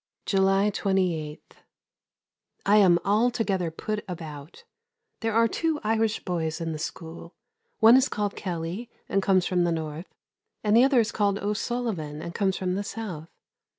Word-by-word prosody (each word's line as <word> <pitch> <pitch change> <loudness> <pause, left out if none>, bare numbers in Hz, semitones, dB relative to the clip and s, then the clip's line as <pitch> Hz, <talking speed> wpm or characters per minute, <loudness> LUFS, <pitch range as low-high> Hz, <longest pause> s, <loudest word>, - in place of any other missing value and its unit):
July 195 +1 +3
28. 180 -7 -2 1.1
I 205 +2 +5
am 185 -4 +6
altogether 210 -4 +1
put 210 +6 -4
about. 160 - -8 0.6
There 225 -1 -1
are 230 0 +5
two 320 +5 -1
Irish 220 0 0
boys 160 -3 -2
in 165 -1 -3
the 155 - -5
school; 165 +1 -7 0.5
one 225 +2 +8
is 265 +1 +4
called 205 -1 -2
Kelley 180 +5 -4 0.2
and 195 - +1
comes 190 -2 +3
from 180 -1 +1
the 175 - +1
North, 160 +1 -5 0.5
and 210 0 +3
the 240 - +7
other 265 -3 +5
is 225 - -2
called 200 -2 +1
O'Sullivan 205 -7 -3
and 170 +2 -6
comes 190 0 0
from 185 -1 -1
the 200 +2 -2
South. 195 -7 -6
195 Hz, 150 wpm, -26 LUFS, 170-220 Hz, 1.1 s, one